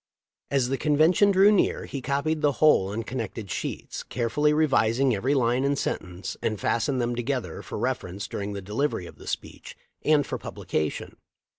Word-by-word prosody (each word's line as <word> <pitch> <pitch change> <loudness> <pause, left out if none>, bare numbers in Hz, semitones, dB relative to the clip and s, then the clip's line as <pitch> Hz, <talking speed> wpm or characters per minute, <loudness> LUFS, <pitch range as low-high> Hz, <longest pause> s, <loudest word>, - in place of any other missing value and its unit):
As 135 -3 +1
the 135 - -1
convention 160 +7 +4
drew 195 +1 +6
near 205 - +2
he 140 - -5
copied 145 +4 -1
the 145 -2 +3
whole 150 -12 +4
on 105 +4 -3
connected 115 -4 -5
sheets, - - -4
carefully 140 +5 0
revising 135 -4 +3
every 130 +8 +1
line 125 0 +2
and 140 0 +1
sentence, 90 -5 -4
and 110 -2 -1
fastened 125 +3 0
them 120 0 0
together, 125 +1 -3
for - - -7
reference 105 -4 -3
during 100 0 -4
the 100 -1 -6
delivery 105 0 -1
of - - -12
the - - -12
speech, - - -6 0.3
and 150 -2 +4
for - - -4
publication. 75 -1 -3
130 Hz, 170 wpm, -26 LUFS, 110-145 Hz, 0.3 s, drew